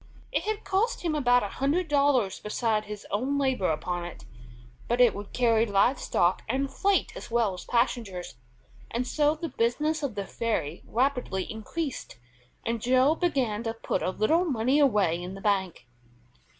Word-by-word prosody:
It - - -1
had 430 0 -2
cost 435 +5 0
him 330 -3 0
about 245 -5 +3
a - - -1
hundred 310 +6 +1
dollars 280 -8 +2
besides 215 0 -1
his 210 -1 -7
own 260 +7 0
labor 265 -8 +1
upon 175 +3 -2
it, 175 -1 -9 0.6
but 240 +1 0
it 245 -2 +6
would 200 0 -8
carry 230 -3 +3
live 205 +6 +3
stock 175 +2 +1
and 270 +3 -1
freight 400 +4 +1
as - - -8
well 230 -4 +1
as 180 - -8
passengers, 230 -7 -1 0.6
and 240 +2 -2
so 295 +3 +2
the 330 +2 -4
business 295 +7 0
of 275 -7 -3
the 200 -1 -3
ferry 190 -9 -2
rapidly 250 -6 0
increased, 265 - -5 0.5
and 230 -1 -1
Joe 255 +5 +4
began 265 -11 0
to 225 -1 -3
put 225 - -2
a - - 0
little 265 - +2
money 265 -3 +1
away 205 - +3
in 180 +2 -6
the - - -8
bank. 190 - 0
240 Hz, 170 wpm, -27 LUFS, 205-280 Hz, 0.6 s, it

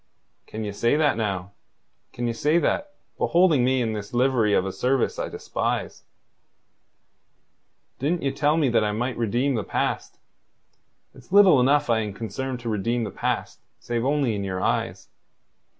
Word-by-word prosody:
"Can 110 +1 -6
ye 105 - -3
say 115 +6 +1
that 150 -1 +2
now? 100 -4 -3 0.6
Can 120 - -4
ye 120 - 0
say 150 +8 +2
that, 290 +11 -1 0.2
beholding 170 -7 +3
me 130 0 +2
in 110 -1 -2
this 105 +2 -6
livery 120 -4 +2
of 90 - +2
a 95 - -2
service 130 +5 0
I - - -2
despise? - - -3 2.0
Didn't 160 +5 -1
ye 135 - +1
tell 145 +3 +1
me 155 -4 +2
that 115 -2 +2
I 105 0 0
might 120 +3 -2
redeem 120 +5 0
the 110 -4 -1
past? - - -2 1.0
It's 130 +2 -18
little 195 -7 +7
enough 145 +3 +3
I 115 -2 +2
am 105 -2 -3
concerned 120 +5 -5
to 120 - -7
redeem 115 +3 -1
the 105 - -4
past - - -3 0.2
save 120 -1 -3
only 140 -3 +1
in 100 -1 -3
your 95 -1 -3
eyes. - - -1
120 Hz, 165 wpm, -24 LUFS, 110-140 Hz, 2.0 s, little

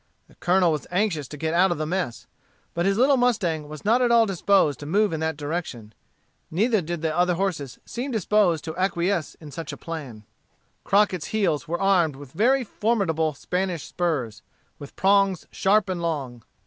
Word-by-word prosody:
The - - -21
Colonel 180 -1 +2
was 150 -4 -3
anxious 180 -7 0
to 150 - -9
get 160 +2 -2
out 180 +2 +4
of 175 - -1
the 155 - -2
mess. 155 -8 -3 0.5
But 170 +2 0
his 195 0 +1
little 270 +3 +4
mustang 180 -12 0
was 155 +3 -9
not 235 +4 +4
at 245 -1 +3
all 230 -1 +6
disposed 190 - +2
to 145 - -8
move 205 +3 +2
in 160 - -2
that 160 -1 -2
direction; 145 -8 -5 0.6
neither 215 +5 +2
did 170 0 -5
the 160 -1 0
other 180 0 +2
horses 165 -8 -3
seem 250 +4 -5
disposed 210 - +2
to 160 -1 -6
acquiesce 185 -2 0
in 150 -3 -12
such 160 0 -6
a 145 - -8
plan. 140 -11 -7 0.6
Crockett's 195 -5 +2
heels 170 -8 0
were 170 +2 -2
armed 175 -7 +3
with 140 -1 -12
very 250 - +2
formidable 190 - 0
Spanish 180 +1 -2
spurs, 140 -12 -2 0.4
with 145 -2 -11
prongs 195 -2 +2
sharp 200 +1 +2
and 185 -2 -3
long. 135 -8 -3
175 Hz, 185 wpm, -24 LUFS, 155-200 Hz, 0.6 s, all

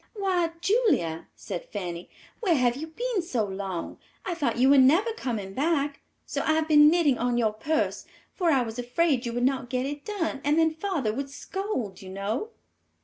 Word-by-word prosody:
"Why, 370 -4 +1
Julia," 345 - +1
said 175 - -6
Fanny, 175 -4 -5 0.3
"where 375 -8 +2
have 245 -3 +2
you 310 +4 -5
been 455 +5 -2
so 255 - -1
long; 190 -3 -5 0.3
I 355 - -1
though 330 -4 0
you 260 +3 +3
were 280 - +7
never 330 - +4
coming 220 - -4
back, 285 +1 0 0.2
so - - -3
I 315 - +2
have 315 0 +1
been 295 -1 +7
knitting 310 -6 +3
on 245 0 +1
your 220 -3 +2
purse, 305 +9 -1 0.3
for 355 -3 +1
I 270 -5 +3
was 225 +1 -6
afraid 250 +1 +1
you 235 - -3
would 245 +1 -1
not 265 -2 0
get 255 0 -1
it 290 +1 -5
done, 340 -10 -3
and 295 +2 +2
then 325 -1 +3
father 315 - -1
would 275 +3 -4
scold, 280 - -4
you 190 - -9
know." 200 - -3
280 Hz, 195 wpm, -27 LUFS, 235-335 Hz, 0.3 s, were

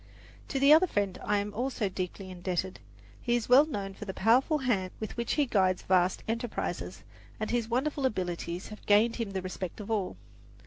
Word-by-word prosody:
To 275 - -2
the 280 +2 +7
other 335 +4 +6
friend 200 - -1
I 210 - +1
am 205 +1 -2
also 245 -2 -1
deeply 185 0 -5
indebted. 180 +1 -3 0.4
He 240 -1 +1
is 240 - -1
well 270 +5 +7
known 200 -9 -4
for 210 - -8
the 190 - -6
powerful 250 - +3
hand 215 -9 0
with 215 - -5
which 235 -1 -1
he 295 - +2
guides 190 -6 +1
vast 185 0 +2
enterprises, 230 +1 -3 0.4
and 215 - -2
his 235 -2 0
wonderful 270 +3 +1
abilities 175 -4 -4
have 215 - -11
gained 215 +3 +4
for - - -2
him 215 -4 -3
the 190 -1 -3
respect 185 0 -5
of 210 +1 -6
all. 205 -4 -1
210 Hz, 195 wpm, -29 LUFS, 190-245 Hz, 0.4 s, the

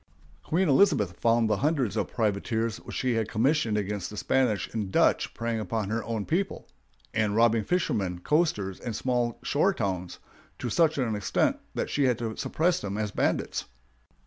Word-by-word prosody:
Queen 180 +4 +1
Elizabeth 140 - +4
found 115 -1 +3
the 105 -2 +1
hundreds 140 -5 0
of - - 0
privateers 110 +1 -1
which - - -9
she 130 -2 0
had 110 -1 -1
commissioned 115 -1 +1
against 100 -2 -2
the 105 - -9
Spanish 120 -3 +1
and 105 -4 -3
Dutch - - +2
preying 115 0 -2
upon 105 0 -2
her 115 0 -1
own 110 -3 -3
people, 190 +4 -2 0.5
and 110 -1 +1
robbing 115 -1 +4
fishermen, 100 - 0
coasters, 105 - 0
and 115 -3 -5
small 120 0 0
shore - - +2
towns, 90 -2 -3 0.4
to 120 - -4
such 160 +2 +3
an 120 -5 0
extent 105 - +1 0.2
that - - -2
she 145 - +2
had 125 -3 +2
to 115 -2 -4
suppress 170 +2 0
them 100 0 -4
as 105 -1 -2
bandits. - - -1
115 Hz, 170 wpm, -27 LUFS, 105-130 Hz, 0.5 s, Elizabeth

